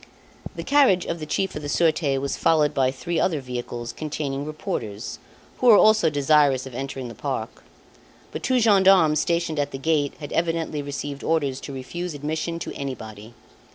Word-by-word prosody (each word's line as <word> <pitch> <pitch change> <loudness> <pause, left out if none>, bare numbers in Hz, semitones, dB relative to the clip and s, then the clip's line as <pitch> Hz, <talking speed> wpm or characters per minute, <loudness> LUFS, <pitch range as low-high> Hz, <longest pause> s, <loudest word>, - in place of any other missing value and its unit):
The - - -5
carriage 270 -11 +4
of 170 - -3
the 155 - -6
Chief 190 +5 -1
of 150 - -4
the 145 - -5
Surete 155 -3 +2
was 140 +1 -2
followed 150 -2 +2
by 135 -3 +2
three 165 +6 -3
other 165 -5 +1
vehicles 120 -2 -6
containing 145 -2 -4
reporters, 125 - -5 0.4
who 250 - +2
were 220 -3 +9
also 215 -6 +5
desirous 145 -2 +3
of 130 - -9
entering 135 0 -5
the 115 - -8
park. - - -5 0.7
But - - -5
two 255 0 +2
gendarmes 190 -8 +5
stationed 170 -2 0
at 145 0 0
the 135 - -6
gate 145 0 0
had 145 -2 -7
evidently 165 -3 -1
received 140 0 -5
orders 145 -5 0
to - - -7
refuse 160 +6 -5
admission 155 +3 -3
to - - -5
anybody. 110 -5 -7
150 Hz, 175 wpm, -24 LUFS, 135-170 Hz, 0.7 s, were